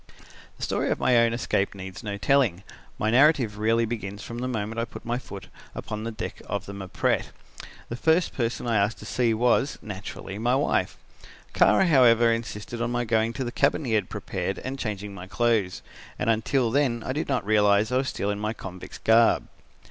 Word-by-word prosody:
"The - - -8
story - - 0
of - - +1
my 125 - +2
own 115 0 +4
escape 100 -4 -1
needs 95 -1 -8
no 105 -3 -4
telling. 115 -6 +2 0.3
My 110 - 0
narrative 125 -5 +4
really 115 +2 +2
begins 105 -3 -5
from 120 0 -6
the 125 - -2
moment 115 -2 -3
I 115 - 0
put 115 - -11
my 120 +1 -1
foot 100 -6 -9 0.3
upon 105 +1 -5
the 115 - -3
deck 110 - -6
of 100 0 -3
the 100 - -8
Mpret. 95 -2 -1 0.6
The 120 - -5
first 160 +6 +2
person 120 -1 -2
I 115 -2 +1
asked 100 +2 +1
to - - -11
see 120 -2 +1
was, 125 +4 +2
naturally, 100 -1 -7
my 120 +3 +2
wife. 140 - 0 0.6
Kara, 190 - +5
however, 120 -7 +5
insisted 115 0 -5
on 120 - 0
my 120 0 -1
going 110 0 +1
to 135 - -3
the 120 - -4
cabin 140 +3 +1
he 115 - -1
had 105 -4 +1
prepared 95 -2 -3
and 135 +1 -5
changing 105 -3 -4
my 95 -1 -9
clothes, 110 -3 0 0.3
and 115 - +1
until 115 +2 +1
then 125 -4 +1
I 130 - -2
did 150 - -2
not 130 -7 0
realise 105 0 +3
I 125 - +2
was 130 0 0
still 100 - -2
in 100 - -4
my 105 +1 -2
convict's 95 -4 -9
garb. 115 +1 +4
115 Hz, 200 wpm, -26 LUFS, 105-120 Hz, 0.6 s, Kara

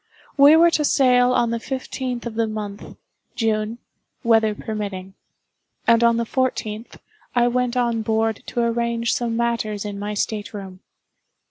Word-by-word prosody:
We 285 +2 +7
were 335 +1 +6
to 305 - +1
sail 250 -3 +4
on 235 -2 +2
the 235 - -1
fifteenth 255 -1 -4
of 235 - -4
the 225 0 0
month 210 -2 -7 0.4
(June), 220 -1 -1 0.5
weather 225 -2 +3
permitting; 200 -3 -5 0.7
and 230 0 +4
on 235 0 +4
the 235 - 0
fourteenth, 230 -3 -2 0.4
I 240 0 +4
went 250 0 0
on 235 -2 +1
board 220 0 0
to 240 - -2
arrange 235 0 0
some 235 -2 -1
matters 230 -3 -1
in 205 -1 -5
my 210 +1 -4
state 210 +1 -3
room. 190 -2 -8
230 Hz, 150 wpm, -22 LUFS, 215-245 Hz, 0.7 s, We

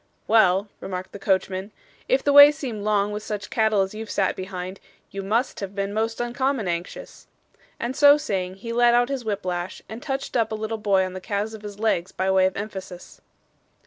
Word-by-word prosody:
'Well,' 200 -2 +4
remarked 185 -1 -6
the 200 - -9
coachman, 190 +1 -1 0.4
'if - - +2
the 285 - +2
way 285 +1 +10
seemed 255 -8 -6
long 205 -1 +1
with 210 0 -4
such 210 -1 -5
cattle 220 -3 +2
as 190 - -6
you've 220 0 -7
sat 195 -2 0
behind, 185 0 -6 0.3
you 195 - -5
MUST 225 +6 -1
have 195 -1 -6
been 200 0 -2
most 225 +1 -1
uncommon 245 -1 -1
anxious;' 170 0 -5 0.5
and 240 +2 -3
so 290 +1 +7
saying, 190 -10 -3
he 230 +4 -6
let 240 0 +4
out 245 +1 +3
his 270 -3 -3
whip 205 -3 -3
lash 180 0 -4
and 225 +2 -8
touched 270 -3 -4
up 225 -2 +1
a - - -1
little 220 +1 -4
boy 195 -3 +2
on 185 - -6
the 185 - -7
calves 210 +2 -3
of 220 - -9
his 205 -1 -8
legs 200 -4 0
by 190 +1 -1
way 190 0 +4
of 190 - -5
emphasis. 190 -3 -8
210 Hz, 210 wpm, -24 LUFS, 190-230 Hz, 0.5 s, way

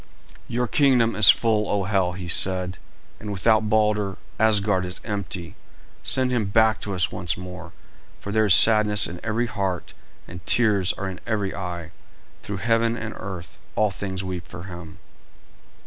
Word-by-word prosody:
"Your 125 +1 -1
kingdom 120 -5 +3
is 105 0 +8
full, 110 -3 +3
O 100 -1 0
Hel!" 95 -2 0
he 90 0 -7
said, 90 +1 0 0.4
"and 105 - -6
without 110 +2 +2
Balder, 105 -3 +1 0.2
Asgard 105 -3 +3
is 90 0 -2
empty. 95 -5 -5 0.5
Send 130 -1 +2
him 120 -4 0
back 110 +2 +2
to 100 -2 -4
us 90 - +1
once 85 -2 -2
more, 90 +1 -9 0.5
for 100 - -7
there 110 0 +2
is 90 - +7
sadness 105 -2 +5
in 90 0 -6
every 115 +2 0
heart 100 -5 -3 0.3
and 90 +1 -10
tears 105 -5 +3
are 95 - -5
in 95 -1 -6
every 105 -4 -1
eye. 85 -4 -6 0.5
Through 100 - -5
heaven 115 0 +2
and 110 -1 -5
earth 95 -3 -8 0.2
all 105 -1 +2
things 95 0 -5
weep 90 -2 -5
for 90 0 -9
him." 85 -4 -10
100 Hz, 165 wpm, -23 LUFS, 90-110 Hz, 0.5 s, is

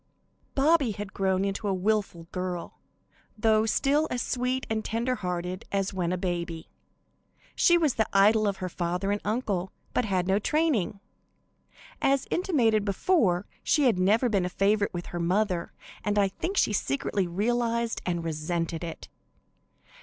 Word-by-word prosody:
Bobby 280 -4 +3
had 205 -1 -7
grown 190 0 +1 0.2
a 200 -2 0
willful 195 -3 0
girl, 180 -2 -4 0.6
though 220 0 +3
still 290 +6 +2
as 250 - -2
sweet 255 +1 -1
and 220 -1 -1
tender 235 +3 -1
hearted 180 0 -3
as 195 0 -1
when 180 -2 -1
a 180 - 0
baby. 170 -2 -4 0.8
She 345 - +5
was 310 -6 +2
the 220 - +1
idol 210 +2 +4
of 200 -1 -1
her 185 - -4
father 180 +2 -2
and 205 - -1
uncle, 205 -5 -1 0.2
but 250 - +1
had 185 -3 0
no 195 +1 +3
training. 260 - 0 1.0
As 275 0 +2
intimated 240 - +2
before, 200 - +2 0.2
she 300 - +2
had 235 -8 +3
never 215 +7 +3
been 200 -5 +1
a 180 - -1
favorite 200 +2 +2
with 175 -1 -5
her 175 - -5
mother, 180 0 0 0.3
and 205 0 0
I 200 -1 +4
think 380 - -4
she - - +3
secretly 180 +3 -1
realized 235 +5 0
and 175 -2 -2
resented 165 +1 -2
it. 165 -1 -7
200 Hz, 155 wpm, -27 LUFS, 180-230 Hz, 1.0 s, She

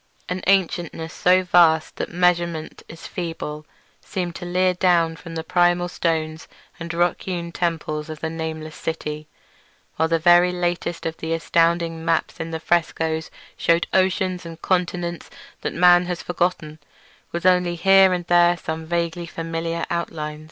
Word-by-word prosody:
An 180 0 -3
ancientness 175 -4 0
so 185 +1 +3
vast 170 -3 +4
that - - -4
measurement 170 -2 0
is 165 - -11
feeble 165 -3 -5 0.4
seemed 175 -2 -3
to 175 - -7
leer 185 +1 +2
down 175 -2 +2
from 165 0 -10
the 160 - -3
primal 175 +1 +2
stones 160 -2 -2 0.3
and 165 0 -5
rock 175 0 +1
hewn 175 -2 -4
temples 160 -3 -2
in 155 - -5
the 160 - -2
nameless 160 -1 -5
city, 150 -1 -5 0.7
while 160 - +2
the 165 0 +2
very 175 +2 +5
latest 175 -1 -2
of 160 0 -3
the 160 0 -3
astounding 165 0 +1
maps 165 -1 0
in 165 - -4
the 160 0 -4
frescoes 160 -1 0 0.3
shewed 170 0 +2
oceans 185 -1 +1
and 165 -1 -9
continents 175 -2 -1 0.3
that - - -2
man 175 0 +5
has 180 -1 -4
forgotten, 175 -3 -2 0.5
with 170 +1 -4
only 180 -1 +3
here 195 +2 +6
and 180 -1 -2
there 175 0 +4
some 160 -1 -5
vaguely 170 0 -2
familiar 165 0 -3
outline. 155 -3 -3
170 Hz, 150 wpm, -22 LUFS, 160-175 Hz, 0.7 s, here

